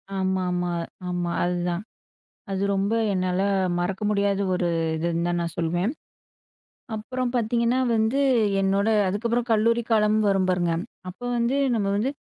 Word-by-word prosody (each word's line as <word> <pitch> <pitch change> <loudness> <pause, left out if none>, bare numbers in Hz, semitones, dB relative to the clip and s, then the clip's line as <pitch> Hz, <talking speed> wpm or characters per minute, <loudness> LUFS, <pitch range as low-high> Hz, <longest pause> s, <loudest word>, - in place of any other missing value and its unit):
ஆமாமா 185 -2 0 0.4
ஆமா 175 -1 -2
அதுதான் 175 0 -1 0.7
அது 190 - -2
ரொம்ப 200 +3 0 0.2
என்னால 185 0 0 0.4
மறக்க 185 +3 -2
முடியாத 200 -1 +1
1 180 -1 0 0.3
இதுன்னு 170 +1 -1
தான் 175 0 0
நான் 170 -1 -4
சொல்லுவேன். 175 +6 0 1.0
அப்புறம் 250 +4 -3
பார்த்தீங்கன்னா 235 +1 +1 0.2
வந்து, 225 +5 +1 0.4
என்னோட 195 +2 +1 0.2
அதுக்கப்புறம் 230 +5 -1
கல்லூரி 230 +2 +3
காலம் 215 -1 +3
வரும் 190 -1 +2
பாருங்க. 175 -2 +1 0.4
அப்ப 185 +6 -10 0.2
வந்து 240 +3 +1 0.2
நம்ம 210 -3 0
வந்து 225 +6 0
195 Hz, 125 wpm, -25 LUFS, 180-220 Hz, 1.0 s, கல்லூரி